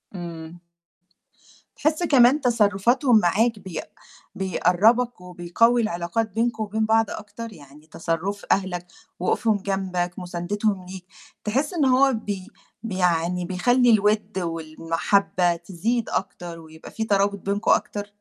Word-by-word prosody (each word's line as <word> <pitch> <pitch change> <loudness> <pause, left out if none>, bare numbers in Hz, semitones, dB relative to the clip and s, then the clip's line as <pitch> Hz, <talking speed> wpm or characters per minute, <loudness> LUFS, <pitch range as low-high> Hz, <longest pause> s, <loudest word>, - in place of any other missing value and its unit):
إمم. 170 -1 -8 1.2
تحس 310 +3 0
كمان 275 -2 +5
تصرفاتهم 235 +1 +3
معاك 215 +4 +1
بيق 185 -5 -7 0.5
بيقرّبك 195 +5 +2
وبيقوّي 180 +7 +1
العلاقات 215 +2 -2
بينكم 225 +1 -1
وبين 220 +1 -1
بعض 225 +1 +3
أكتر، 215 +2 -8
يعني 150 -2 -16
تصرُّف 165 +5 -3
أهلك، 180 -2 0 0.3
وقوفهم 215 +4 +1
جنبك، 190 -3 -2
مساندتهم 185 +2 -2
ليك، 185 0 -9 0.4
تحس 270 - -1
إن 320 -5 +1
هو 265 +1 +4
بي 205 -4 -4 0.4
بي 210 -5 -4
يعني 175 0 +1
بيخلّي 245 +8 +2
الوِد 210 -2 +2
والمحبة 165 +2 0
تزيد 195 +7 -2
أكتر 175 -3 -4
ويبقى 160 0 -13
في 225 - -3
ترابط 200 -1 +1
بينكم 200 +3 0
أكتر؟ 205 0 0
200 Hz, 120 wpm, -24 LUFS, 175-225 Hz, 1.2 s, كمان